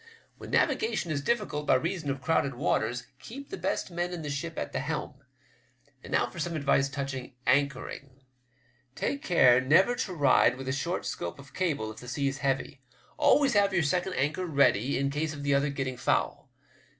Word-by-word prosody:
When -, -, -9 dB
navigation 435 Hz, -, +1 dB
is 140 Hz, -2 st, -1 dB
diflScult 175 Hz, -6 st, -1 dB
by -, -, +5 dB
reason 165 Hz, +2 st, -1 dB
of 135 Hz, -1 st, -3 dB
crowded 140 Hz, -3 st, +1 dB
waters, 125 Hz, -1 st, 0 dB
keep 275 Hz, +4 st, -10 dB
the -, -, -3 dB
best 185 Hz, +1 st, -2 dB
men 175 Hz, +1 st, -2 dB
in 170 Hz, -2 st, -5 dB
the 145 Hz, -, -4 dB
ship 160 Hz, +3 st, -4 dB
at -, -, -3 dB
the -, -, -2 dB
helm. 150 Hz, +1 st, -3 dB, 0.9 s
And -, -, -10 dB
now -, -, +3 dB
for 120 Hz, +7 st, -9 dB
some 170 Hz, +1 st, -2 dB
advice 140 Hz, -2 st, +2 dB
touching 135 Hz, -2 st, -5 dB
anchoring. 135 Hz, -1 st, -1 dB, 0.7 s
Take 280 Hz, -, -2 dB
care 130 Hz, -8 st, +5 dB
never 165 Hz, -, +4 dB
to 185 Hz, -, -2 dB
ride 140 Hz, -3 st, +4 dB
with 135 Hz, 0 st, -7 dB
a -, -, 0 dB
short 170 Hz, +6 st, -2 dB
scope 85 Hz, -, -4 dB
of 140 Hz, 0 st, -14 dB
cable 145 Hz, -12 st, -1 dB
if 110 Hz, -, -13 dB
the 125 Hz, -, -10 dB
sea's 135 Hz, +2 st, -2 dB
heavy. 135 Hz, -1 st, -2 dB, 0.4 s
Always 280 Hz, -3 st, +4 dB
have 200 Hz, -2 st, +3 dB
your 175 Hz, -, +3 dB
second 180 Hz, +5 st, 0 dB
anchor 150 Hz, +7 st, -1 dB
ready 140 Hz, -4 st, +2 dB
in 140 Hz, 0 st, 0 dB
case 155 Hz, +1 st, -2 dB
of 145 Hz, -, -7 dB
the 140 Hz, 0 st, +2 dB
other 140 Hz, +1 st, +2 dB
getting 135 Hz, -2 st, -3 dB
foul. -, -, -1 dB
145 Hz, 190 wpm, -28 LUFS, 135-170 Hz, 0.9 s, by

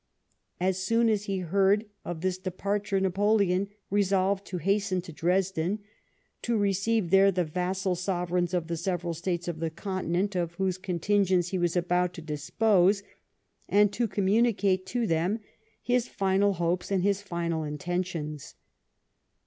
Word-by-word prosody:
As 185 Hz, +1 st, +1 dB
soon 230 Hz, +4 st, +2 dB
as 210 Hz, -2 st, 0 dB
he 195 Hz, -1 st, -2 dB
heard 195 Hz, +4 st, +2 dB, 0.2 s
of 175 Hz, -2 st, -5 dB
this 185 Hz, 0 st, -1 dB
departure 200 Hz, +2 st, -1 dB
Napoleon 195 Hz, 0 st, +2 dB, 0.2 s
resolved 195 Hz, 0 st, +1 dB
to 185 Hz, -, -4 dB
hasten 195 Hz, +1 st, +1 dB
to 170 Hz, -3 st, -10 dB
Dresden, 180 Hz, +2 st, 0 dB, 0.6 s
to 235 Hz, -1 st, 0 dB
receive 200 Hz, -1 st, +1 dB
there 195 Hz, 0 st, +6 dB
the 180 Hz, -1 st, 0 dB
vassal 185 Hz, +3 st, -1 dB
sovereiirns 180 Hz, -1 st, -1 dB
of 175 Hz, -2 st, 0 dB
the 170 Hz, 0 st, -3 dB
several 175 Hz, 0 st, -2 dB
States 175 Hz, +1 st, -3 dB
of 170 Hz, -2 st, -3 dB
the 165 Hz, 0 st, -1 dB
Continent 185 Hz, +2 st, -2 dB
of 170 Hz, -1 st, -2 dB
whose 185 Hz, 0 st, -1 dB
contingents 185 Hz, 0 st, +1 dB
he 185 Hz, -, -2 dB
was 175 Hz, 0 st, 0 dB
about 180 Hz, 0 st, +1 dB
to 170 Hz, -, -7 dB
dispose, 185 Hz, +6 st, +2 dB, 0.7 s
and 205 Hz, 0 st, +4 dB
to 235 Hz, -1 st, 0 dB
communicate 200 Hz, -2 st, +2 dB
to 240 Hz, +3 st, -1 dB
them 175 Hz, +3 st, +1 dB, 0.5 s
his 245 Hz, 0 st, +1 dB
final 195 Hz, +1 st, +1 dB
hopes 175 Hz, 0 st, -1 dB
and 190 Hz, -2 st, +1 dB
his 200 Hz, 0 st, +1 dB
final 170 Hz, -4 st, -2 dB
intentions. 155 Hz, -1 st, -4 dB
185 Hz, 145 wpm, -28 LUFS, 175-200 Hz, 0.7 s, there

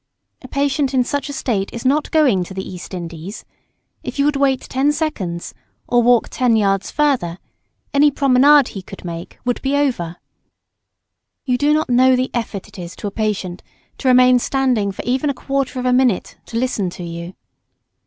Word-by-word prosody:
A 260 Hz, -, -10 dB
patient 275 Hz, 0 st, 0 dB
in 255 Hz, -, +4 dB
such 285 Hz, +2 st, -3 dB
a -, -, -5 dB
state 210 Hz, -8 st, -2 dB
is 235 Hz, +2 st, -7 dB
not 290 Hz, +4 st, +2 dB
going 265 Hz, -, +3 dB
to 190 Hz, -, -10 dB
the 190 Hz, -, -5 dB
East 180 Hz, +1 st, -8 dB
Indies. 170 Hz, +3 st, -7 dB, 0.6 s
If -, -, -6 dB
you 280 Hz, -, +2 dB
would 295 Hz, 0 st, +2 dB
wait 275 Hz, -2 st, +2 dB
ten 270 Hz, +3 st, +1 dB
seconds, 230 Hz, -, -3 dB, 0.3 s
or 240 Hz, 0 st, +3 dB
walk 240 Hz, -1 st, +3 dB
ten 245 Hz, -3 st, +2 dB
yards 195 Hz, -2 st, +1 dB
further, 260 Hz, -, 0 dB, 0.6 s
any 290 Hz, +1 st, +5 dB
promenade 275 Hz, 0 st, +5 dB
he 195 Hz, -, -7 dB
could 185 Hz, -, -11 dB
make 170 Hz, 0 st, -7 dB
would 245 Hz, -1 st, -1 dB
be 275 Hz, +1 st, 0 dB
over. 240 Hz, -13 st, 0 dB, 1.3 s
You 250 Hz, -2 st, +1 dB
do 290 Hz, +4 st, +2 dB
not 310 Hz, +1 st, +2 dB
know 255 Hz, +1 st, +5 dB
the 255 Hz, +1 st, -1 dB
effort 225 Hz, -5 st, -4 dB
it -, -, -13 dB
is 175 Hz, 0 st, -7 dB
to -, -, -8 dB
a 205 Hz, -, -2 dB
patient 200 Hz, -4 st, -2 dB, 0.4 s
to 270 Hz, -, -2 dB
remain 250 Hz, 0 st, +6 dB
standing 250 Hz, -6 st, 0 dB
for 190 Hz, -, -7 dB
even 260 Hz, +4 st, 0 dB
a 280 Hz, -, -1 dB
quarter 275 Hz, 0 st, -2 dB
of 250 Hz, -, -3 dB
a 250 Hz, -, +3 dB
minute 250 Hz, -6 st, +1 dB
to 230 Hz, -, -4 dB
listen 230 Hz, -6 st, 0 dB
to 175 Hz, -, -9 dB
you. 170 Hz, +1 st, -7 dB
250 Hz, 190 wpm, -19 LUFS, 195-275 Hz, 1.3 s, remain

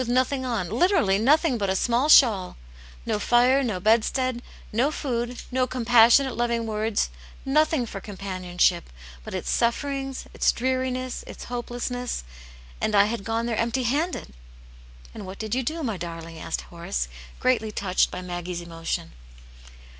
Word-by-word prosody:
nothing 255 Hz, +2 st, +1 dB
on, 230 Hz, -8 st, -2 dB
literally 330 Hz, -, +2 dB
nothing 280 Hz, +2 st, +3 dB
but 200 Hz, -2 st, 0 dB
a 190 Hz, -, +1 dB
small 240 Hz, +8 st, +1 dB
shawl; 215 Hz, -11 st, +5 dB, 0.5 s
no -, -, 0 dB
fire, 250 Hz, +5 st, +4 dB
no 215 Hz, -7 st, -2 dB
bedstead, 235 Hz, +4 st, +2 dB, 0.3 s
no 245 Hz, +6 st, +2 dB
food, 245 Hz, -5 st, -3 dB
no 255 Hz, 0 st, +1 dB
compassionate, 240 Hz, +2 st, +5 dB
loving 235 Hz, -1 st, 0 dB
words, 215 Hz, -, -1 dB, 0.3 s
nothing 300 Hz, -1 st, +2 dB
for 200 Hz, -3 st, -7 dB
companionship, 185 Hz, -3 st, -1 dB, 0.3 s
but -, -, -7 dB
its -, -, -2 dB
sufferings, 270 Hz, +3 st, -1 dB
its -, -, +3 dB
dreariness, 255 Hz, 0 st, -2 dB
its -, -, -9 dB
hopelessness! 245 Hz, -, -4 dB, 0.6 s
And 215 Hz, -, +1 dB
I 200 Hz, -, +7 dB
had 215 Hz, -1 st, -3 dB
gone 225 Hz, +1 st, -1 dB
there 235 Hz, -1 st, -1 dB
empty 235 Hz, +3 st, 0 dB
handed 290 Hz, -, -1 dB, 0.4 s
!" -, -, -21 dB
"And -, -, -8 dB
what 190 Hz, +1 st, -8 dB
did 220 Hz, 0 st, -4 dB
you 260 Hz, -, +1 dB
do, 315 Hz, +6 st, -3 dB
my 225 Hz, -7 st, -2 dB
darling?" 165 Hz, -1 st, -7 dB
asked 60 Hz, -, -3 dB
Horace, -, -, -4 dB, 0.3 s
greatly 230 Hz, -4 st, +1 dB
touched 190 Hz, -3 st, +1 dB
by 180 Hz, -, -6 dB
Maggie's 175 Hz, 0 st, -4 dB
emotion. 165 Hz, -, -4 dB
235 Hz, 150 wpm, -25 LUFS, 190-255 Hz, 0.6 s, I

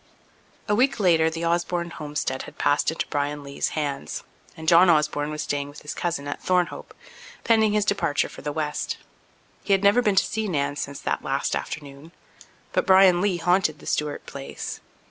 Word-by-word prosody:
A 210 Hz, -, +2 dB
week 255 Hz, +3 st, +2 dB
later 165 Hz, -5 st, +4 dB
the 165 Hz, +1 st, -4 dB
Osborne 170 Hz, 0 st, 0 dB
homestead 145 Hz, -4 st, -3 dB
had -, -, -22 dB
passed 145 Hz, -, +2 dB
into 160 Hz, -, -2 dB
Bryan 145 Hz, 0 st, -2 dB
Lee's 140 Hz, 0 st, -2 dB
hands 140 Hz, -, -3 dB, 0.3 s
and 160 Hz, 0 st, -8 dB
John 175 Hz, +2 st, +7 dB
Osborne 150 Hz, -2 st, +2 dB
was 150 Hz, 0 st, -3 dB
staying 145 Hz, 0 st, -2 dB
with 145 Hz, -, -13 dB
his 150 Hz, -, -5 dB
cousin 155 Hz, -5 st, -3 dB
at 145 Hz, -, -5 dB
Thornhope, 180 Hz, -1 st, -1 dB, 0.5 s
pending 220 Hz, -2 st, +3 dB
his 210 Hz, -1 st, +2 dB
departure 170 Hz, -8 st, +1 dB
for -, -, -11 dB
the 150 Hz, -, -3 dB
west. 150 Hz, -1 st, -2 dB, 0.7 s
He 200 Hz, -, +2 dB
had 195 Hz, 0 st, +2 dB
never 200 Hz, +5 st, +5 dB
been 210 Hz, -4 st, +2 dB
to -, -, +4 dB
see 220 Hz, 0 st, -2 dB
Nan 145 Hz, -5 st, -1 dB
since 140 Hz, -1 st, -5 dB
that -, -, -2 dB
last -, -, -1 dB
afternoon, 145 Hz, +2 st, -7 dB, 0.6 s
but -, -, +1 dB
Bryan 190 Hz, -2 st, +6 dB
Lee 195 Hz, -3 st, +1 dB
haunted 175 Hz, -2 st, +2 dB
the -, -, -15 dB
Stewart 150 Hz, -1 st, -2 dB
place. 140 Hz, -1 st, -7 dB
160 Hz, 185 wpm, -24 LUFS, 145-185 Hz, 0.7 s, John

